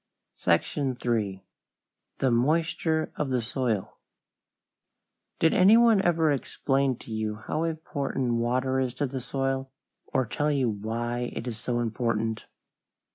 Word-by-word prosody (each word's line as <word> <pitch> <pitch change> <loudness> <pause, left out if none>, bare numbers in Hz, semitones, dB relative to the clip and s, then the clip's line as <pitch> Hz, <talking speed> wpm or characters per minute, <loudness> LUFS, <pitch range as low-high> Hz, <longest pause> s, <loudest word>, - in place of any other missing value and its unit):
SECTION 130 - 0
III. 105 -5 0 0.7
THE 130 - +2
MOISTURE 160 +5 +1
OF 150 - -1
THE 130 -1 +1
SOIL 115 -3 -2 1.4
Did 160 - +3
any 195 +5 +7
one 230 -4 +5
ever 165 -4 +3
explain 135 -1 0
to 115 - -12
you 110 -1 -2
how 155 +9 -2
important 140 -6 -2
water 130 +2 +1
is 125 -2 -1
to 145 - 0
the 130 -1 -4
soil, 135 +1 -2 0.4
or 130 -1 0
tell 145 +6 -1
you 135 -5 +1
why 120 +4 -3
it 120 - -5
is 115 -2 -4
so 120 +1 -1
important? 115 -1 -1
130 Hz, 130 wpm, -27 LUFS, 115-145 Hz, 1.4 s, any